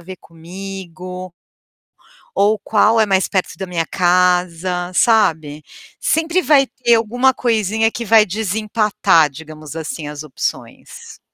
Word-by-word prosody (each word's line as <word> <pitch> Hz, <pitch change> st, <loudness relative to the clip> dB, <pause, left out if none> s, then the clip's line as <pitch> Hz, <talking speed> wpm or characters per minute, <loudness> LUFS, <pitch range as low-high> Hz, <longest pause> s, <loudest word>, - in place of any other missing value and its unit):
ver 185 Hz, +2 st, -10 dB
comigo" 180 Hz, +1 st, -9 dB, 1.0 s
"ou 205 Hz, +1 st, +2 dB
qual 220 Hz, +1 st, +3 dB
é 220 Hz, -, +4 dB
mais 190 Hz, -2 st, +1 dB
perto 190 Hz, -2 st, -2 dB
da 190 Hz, -, -5 dB
minha 170 Hz, -2 st, -2 dB
casa.", 180 Hz, 0 st, 0 dB
sabe, 160 Hz, -10 st, +1 dB, 0.4 s
sempre 330 Hz, +3 st, +1 dB
vai 275 Hz, -2 st, +3 dB
ter 240 Hz, -2 st, +1 dB
alguma 245 Hz, +4 st, +1 dB
coisinha 225 Hz, -2 st, 0 dB
que 235 Hz, -, -6 dB
vai 220 Hz, 0 st, +5 dB
desempatar, 210 Hz, -4 st, +1 dB
digamos 155 Hz, +1 st, -11 dB
assim, 160 Hz, -1 st, -6 dB
as 150 Hz, 0 st, -7 dB
opções. 150 Hz, -4 st, -7 dB
190 Hz, 120 wpm, -18 LUFS, 170-220 Hz, 1.0 s, vai